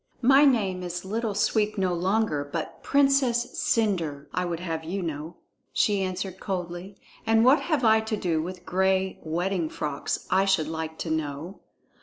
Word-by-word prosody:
"My 270 +4 +7
name 200 -9 +2
is 175 0 -5
Little 215 +1 -2
Sweep 215 +1 +1
no 185 -2 +1
longer, 185 -3 +1
but 155 +3 -5
Princess 275 -4 +2
Cendre, 170 -11 0
I 180 +1 0
would 170 -2 -3
have 165 -2 -4
you 185 +4 -3
know," 160 +1 -5 0.4
she 205 -2 +2
answered 185 0 -3
coldly. 180 0 -5 0.3
"And 225 +1 +3
what 270 +4 +6
have 305 -6 -1
I 220 0 +6
to 220 0 -2
do 165 -5 0
with 180 +2 -7
gray 190 +1 +1
wedding 170 +1 -1
frocks, 145 -2 -3
I 190 +1 +4
should 190 -6 +2
like 160 0 -4
to 160 - -3
know?" 160 +3 -3
185 Hz, 165 wpm, -26 LUFS, 165-215 Hz, 0.4 s, My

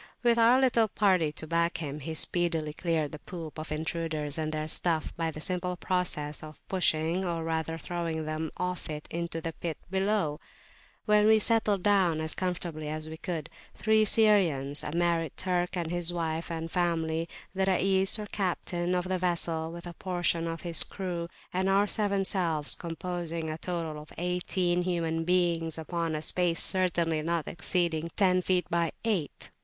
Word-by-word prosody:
With 235 -1 +4
our 235 +3 +6
little 240 -4 +4
party 185 -7 +2
to 160 - -4
back 170 +1 +1
him, 150 -2 -4
he 160 +3 -5
speedily 165 -2 +1
cleared 160 -3 0
the 150 - -7
poop 165 -3 -7
of 155 0 -6
intruders 155 -1 -2
and 155 0 -1
their 155 0 -2
stuff 160 0 0
by 165 -1 -1
the 155 - -7
simple 180 +2 -2
process 175 -6 -1
of 155 -1 -12
pushing 175 -1 +1
or 170 -3 -2
rather 160 0 -2
throwing 165 -2 -3
them 155 +1 -2
off 180 -2 -3
it 150 -1 -5
into 170 -1 -3
the 165 0 -4
pit 165 0 -4
below. 190 -6 +1 0.7
We 210 -1 +5
then 220 +1 +6
settled 215 -4 +2
down 190 -6 +3
as 160 0 -1
comfortably 170 -4 -3
as 155 0 -4
we 160 - -6
could; 165 -3 -4 0.3
three 220 0 +4
Syrians, 180 -11 +3
a - - -4
married 170 -2 0
Turk 180 -1 0
with 170 -2 -2
his 175 -1 0
wife 165 -1 -2
and 165 0 -4
family, 165 -2 0 0.2
the 190 0 +1
Rais 190 +1 +4
or 210 - -4
captain 180 -3 -1
of 180 0 -1
the 185 0 0
vessel, 170 -2 0
[p.190] - - -8
with 170 0 -8
a 175 - -6
portion 175 -2 -1
of 165 0 -4
his 170 -2 +1
crew, 175 -3 -3 0.3
and 190 +1 +1
our 200 +1 +4
seven 200 -2 0
selves, 165 -6 +3
composing 170 -1 -4
a 155 - -5
total 165 -4 -3
of 150 - -14
eighteen 180 0 0
human 165 -2 -1
beings, 170 -2 +1
upon 165 0 -2
a 155 - -3
space 175 0 +2
certainly 170 -4 +1
not 165 0 -1
exceeding 170 -1 0
ten 185 -2 +4
feet 180 0 +1
by 170 -2 +1
eight. 190 -10 -1
170 Hz, 175 wpm, -29 LUFS, 160-185 Hz, 0.7 s, our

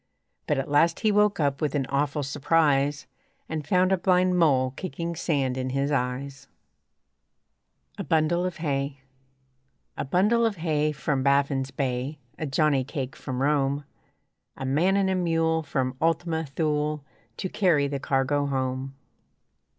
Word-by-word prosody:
But 150 - +1
at 135 - -2
last 165 +4 +2
he 215 - +3
woke 210 -1 +3
up 140 -2 0
with 150 -2 -1
an 135 -2 0
awful 145 +2 -1
surprise 145 -1 +1 0.4
And 155 -2 -4
found 185 +3 +3
a 190 - +2
blind 180 0 +3
mole 135 -7 +3
kicking 170 +3 -5
sand 135 -6 -1
in 130 0 -2
his 135 +2 -1
eyes. 135 +1 -3 1.5
A - - -2
BUNDLE 165 +2 +1
OF 180 -1 -3
HAY 140 -3 -2 0.9
A - - -3
bundle 205 - +2
of 225 -3 +1
hay 155 -3 0
From 140 -2 -1
Baffin's 140 0 +2
Bay, 135 +2 -3 0.2
A 155 - -2
johnny 140 -1 +2
cake 135 -1 -5
from 130 0 -4
Rome, 140 0 +1 0.7
A 135 - -5
man 165 +9 +2
and 195 -1 +2
a 190 - +1
mule 165 -2 +1
From 135 -4 -2
Ultima 165 -1 0
Thule 150 0 -1 0.3
To - - -3
carry 165 -9 +2
the 140 -1 -3
cargo 140 +1 0
home. 130 0 -2
145 Hz, 150 wpm, -26 LUFS, 135-165 Hz, 1.5 s, he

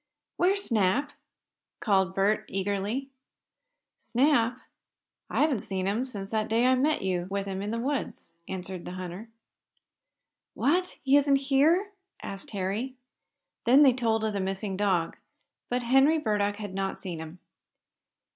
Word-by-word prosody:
"Where's 395 +3 +2
Snap?" 235 - +1 0.7
called 190 -3 +1
Bert, 210 +2 +2
eagerly. 205 +7 -2 0.9
"Snap? 245 -2 +2 0.7
I - - 0
haven't 300 -7 +2
seen 190 -1 -3
him 220 +7 0
since 200 -5 -7
that 215 -1 0
day 230 +2 +2
I 255 - +5
met 285 +1 +1
you 180 -2 -1
with 200 0 -2
him 195 -1 -4
in 205 - -3
the 230 - -2
woods," 265 -3 -3 0.2
answered 185 -1 -5
the 180 - -6
hunter. 185 +4 -7 1.3
"What! 360 +5 +1
Isn't 280 +1 +5
he 275 - -1
here?" 345 +8 +4 0.3
asked 195 -1 -7
Harry. 205 +6 -3 0.7
Then 265 +5 +7
they 265 -3 +6
told 225 -3 0
of 215 -1 0
the 200 - -1
missing 195 +1 -3
dog. 185 -4 0 0.5
But 245 0 -1
Henry 270 +6 +4
Burdock 210 -7 0
had 205 -2 -7
not 195 0 -3
seen 175 -4 -5
him. 160 +2 -8
215 Hz, 145 wpm, -28 LUFS, 195-265 Hz, 1.3 s, Then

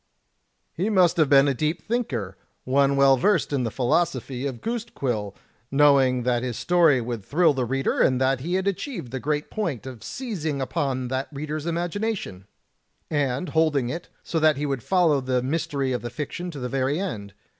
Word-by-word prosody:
"He 190 +6 -1
must 185 -5 +4
have 155 -4 +3
been 140 0 +6
a 140 - +2
deep 155 +5 -1
thinker, 130 - -2 0.3
one 140 +1 +2
well 135 -1 +5
versed 205 +1 +2
in 140 - +1
the - - -1
philosophy 130 +1 0
of 130 -4 -6
goose 230 -1 -2
quill, 105 -7 -2 0.3
knowing 135 -3 +4
that 120 -1 +1
his 125 -3 -3
story 170 -6 +4
would 115 -3 -4
thrill 160 - +3
the 130 -2 -1
reader, 135 +3 -1
and 130 -1 +3
that 130 0 +2
he 170 +7 -2
had 190 +1 0
achieved 200 - -3
the 130 - -3
great 150 +2 -2
point 170 - -3
of 130 -4 -9
seizing. 175 - -4
upon 130 -2 -2
that 130 +1 -2
reader's 150 +2 -4
imagination, 175 - -3 0.6
and 145 +2 0
holding 150 -6 +2
it, 170 +6 -6
so 165 - -1
that 155 -2 +4
he 145 - -2
would 135 -4 -2
follow 165 - +2
the 130 -1 0
mystery 140 -1 -1
of 125 - -1
the 120 - -5
fiction 150 +8 -5
to 155 - -8
the 125 - -3
very 135 +4 0
end. 105 - -5
140 Hz, 190 wpm, -24 LUFS, 130-165 Hz, 0.6 s, been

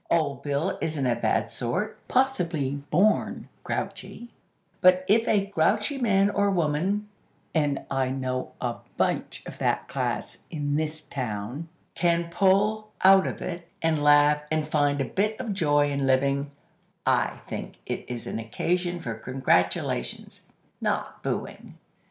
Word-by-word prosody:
Old 140 -5 +1
Bill 145 +6 -1
isn't 155 -4 -1
a 120 -2 +2
bad 115 -2 0
sort; 180 - -2
possibly 175 - +1 0.2
born 200 +7 +2 0.2
grouchy; 240 - -5 0.5
but 185 0 +5
if 225 +3 +4
a 200 -2 +3
grouchy 200 - +1
man 200 -4 +3
or 200 0 +2
woman, 185 +4 0 0.5
(and 145 -3 0
I 135 -1 +1
know 130 -1 -3
a 120 -2 -2 0.2
bunch - - -1
of - - -9
that - - 0
class - - -3
in 145 -2 -2
this 155 0 -2
town!) 125 +4 -4 0.2
can 170 -1 +1
pull 205 +4 +2
out 190 0 +7
of - - -5
it, 170 -1 -5 0.2
and 160 -2 +2
laugh, 145 0 +5
and 155 -1 0
find 145 -2 +2
a - - 0
bit 210 - -1
of 235 -5 -2
joy 145 -5 +2
in 140 -1 0
living, 140 +2 +2 0.6
I - - +1
think - - -6
it - - -3
is 120 -2 -5
an - - -3
occasion 175 +10 -1
for 120 -7 -3
congratulations, 110 - -1 0.3
not - - -2
booing." - - -4
155 Hz, 140 wpm, -26 LUFS, 140-190 Hz, 0.6 s, out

